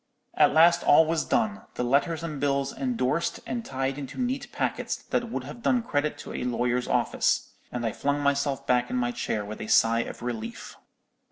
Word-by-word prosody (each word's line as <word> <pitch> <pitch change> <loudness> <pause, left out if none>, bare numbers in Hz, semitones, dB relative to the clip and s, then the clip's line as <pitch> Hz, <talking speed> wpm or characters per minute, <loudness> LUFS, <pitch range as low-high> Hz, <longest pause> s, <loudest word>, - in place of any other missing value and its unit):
At - - +5
last 165 +3 +6
all 160 +2 +6
was 160 0 0
done, 215 -2 0
the - - -1
letters 155 +6 +1
and 155 -4 -4
bills 140 -1 0
endorsed 170 - -1
and 240 -1 -3
tied 135 -4 -2
into 135 - -7
neat 260 +2 -2
packets - - -2
that 240 -1 -3
would - - -3
have 240 - -9
done 245 0 +2
credit 150 -7 -1
to - - -7
a - - -3
lawyer's 125 0 0
office; - - +1 0.2
and 120 -1 -3
I 115 - 0
flung 145 +5 -1
myself 140 -1 0
back 125 -1 +2
in - - -2
my 120 -1 0
chair 105 -3 -2
with 105 +1 -7
a - - -5
sigh 115 +1 +4
of 115 - -5
relief. 115 -2 -5
140 Hz, 195 wpm, -27 LUFS, 125-165 Hz, 0.2 s, last